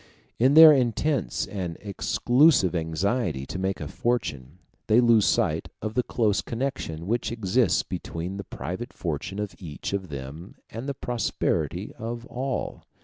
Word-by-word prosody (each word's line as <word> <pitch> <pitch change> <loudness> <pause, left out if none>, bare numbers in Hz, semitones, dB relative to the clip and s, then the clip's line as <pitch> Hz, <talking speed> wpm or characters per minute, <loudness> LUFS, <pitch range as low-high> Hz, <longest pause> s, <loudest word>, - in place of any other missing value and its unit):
In 130 +5 +4
their 160 -1 +11
intense 125 - 0
and 90 -5 -5
exclusive 120 - +3
anxiety 80 - -1
to 95 - -5
make 95 +1 -1
a - - -5
fortune, 80 - -2 0.3
they 110 +2 +5
lose 115 -4 +5
sight - - +1
of 110 0 -4
the 125 - +2
close 110 -4 +1
connection 115 - -4
which 115 +4 -1
exists 115 +1 +2
between 90 0 -5
the 100 - -5
private 115 +9 -6
fortune 85 +3 -4
of 105 -1 -3
each 80 0 -6
of 95 -3 -3
them 70 +6 -8 0.2
and 115 +6 -5
the 140 - -3
prosperity 120 -2 -2
of 120 +1 -5
all. 130 +2 -4
105 Hz, 145 wpm, -26 LUFS, 85-120 Hz, 0.3 s, their